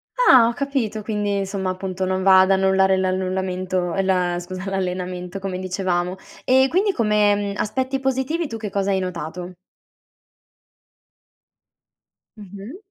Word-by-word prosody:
Ah, 260 - +6
ho 235 - -1
capito 240 -6 -2
quindi, 205 -2 -1
insomma, 195 -1 -2
appunto, 185 0 -4
non 185 0 -1
va 190 -1 +7
ad 190 +1 +3
annullare 190 0 +3
l'annullamento 185 -1 -1
ehm, 195 - 0
la 180 -2 +1
scusa, 185 +2 -6
l'allenamento 180 0 -4
come 190 -1 -4
dicevamo. 185 -1 -2 0.3
Ehm, 265 +1 +4
quindi 395 +6 +2
come, 210 -5 +2
mhmm, 200 -1 -3
aspetti 260 +4 -1
positivi 265 +5 -1
tu 230 -4 -6
che 215 -2 -5
cosa 200 0 -1
hai 190 - +1
notato? 180 0 -5 2.8
Mh-mh. 205 - -10
190 Hz, 135 wpm, -22 LUFS, 185-215 Hz, 2.8 s, va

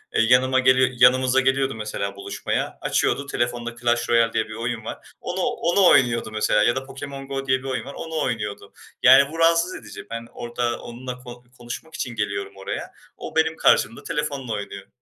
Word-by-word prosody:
eee, - - +4
yanıma 130 +3 +4
geliyor 130 0 +4
yanımıza 130 +1 +5
geliyordu 135 0 +1
mesela 105 -2 -4
buluşmaya. 100 0 -3
Açıyordu 140 - 0
telefonda 120 -1 -2
Clash 120 0 0
Royale 115 -1 +3
diye 110 - 0
bir 110 - -8
oyun 115 0 -4
var. - - -7
Onu - - -3
onu 180 +3 +2
oynuyordu 115 -3 +3
mesela 105 -1 +2
ya 120 - +3
da - - 0
Pokémon 135 0 -8
GO 135 0 -4
diye 130 0 +3
bir - - -15
oyun 130 -1 -3
var, 140 - -8
onu 160 +1 -5
oynuyordu. 105 -4 -4 0.3
Yani, 135 +3 +7
bu 165 - -7
rahatsız 170 +2 +3
edici. 105 -3 -10
Ben, 115 0 -6
orada 120 0 -3
onunla 125 +1 -7
ko 125 -1 -11
konuşmak 120 +7 -8
için 120 -6 -4
geliyorum 100 -2 -3
oraya. 95 - -5 0.3
O, - - -8
benim 160 0 +2
karşımda 115 - +3
telefonla 145 -6 -3
oynuyor. 100 -1 -6
125 Hz, 185 wpm, -23 LUFS, 115-135 Hz, 0.3 s, Yani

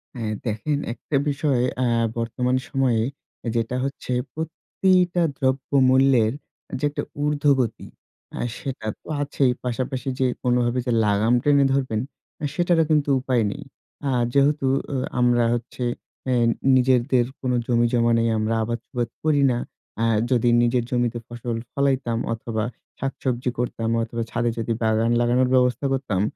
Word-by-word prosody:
হ্যাঁ 110 -3 -3
দেখেন 120 +7 -1 0.2
একটা 140 - -5
বিষয় 140 -3 +1 0.2
এ্যা 125 - +2 0.3
বর্তমান 125 +2 0
সময়ে 130 -5 +2 0.5
যেটা 115 +1 -1
হচ্ছে 135 -2 -4 0.2
প্রতিটা 175 +2 +1
দ্রব্য 130 +1 -1 0.2
মূল্যের 130 -4 +4 0.5
যে - - -10
একটা 145 - -4 0.2
উর্ধ্বগতি 140 -5 +1 0.5
এ্যা - - -4 0.2
সেটা 130 -5 -5
তো - - -19
আছেই 140 -2 +1
পাশাপাশি 130 +2 -3
যে 130 - +3 0.2
কোনভাবে 125 0 +1
যে 125 - 0
লাগাম 105 +3 +2
টেনে 140 -1 +4
ধরবেন, 130 -6 0 0.5
সেটারও 175 -1 +2
কিন্তু 150 -2 +2
উপায় 125 -3 +1
নেই। - - -7 0.5
আর 125 -2 +2
যেহেতু 140 0 +3 0.3
এ - - +1 0.2
আমরা 120 -1 +4
হচ্ছে 120 +1 -4 0.4
এ্যা 130 - +2 0.4
নিজেদের 125 -1 +3 0.2
কোন 130 -1 -1 0.2
জমিজমা 120 0 +2
নেই 115 0 +2
আমরা 110 +1 0
আবাদসুবাদ 120 +1 -3
করি 150 -2 +3
না। 120 - 0 0.4
এ্যাঁ 115 -1 +2
যদি 120 -1 +3
নিজের 120 0 +2
জমিতে 120 -1 0
ফসল 120 -1 -4 0.2
ফলাইতাম 135 -4 +1 0.2
অথবা 110 -1 -3 0.4
শাকসবজি 130 -2 -2
করতাম 115 -2 -2
অথবা 115 +1 -4
ছাদে 120 0 0
যদি 115 0 -1
বাগান 110 +1 +2
লাগানোর 125 +1 +2
ব্যবস্থা 125 +1 +2
করতাম, 110 -8 -1
125 Hz, 135 wpm, -23 LUFS, 115-135 Hz, 0.5 s, মূল্যের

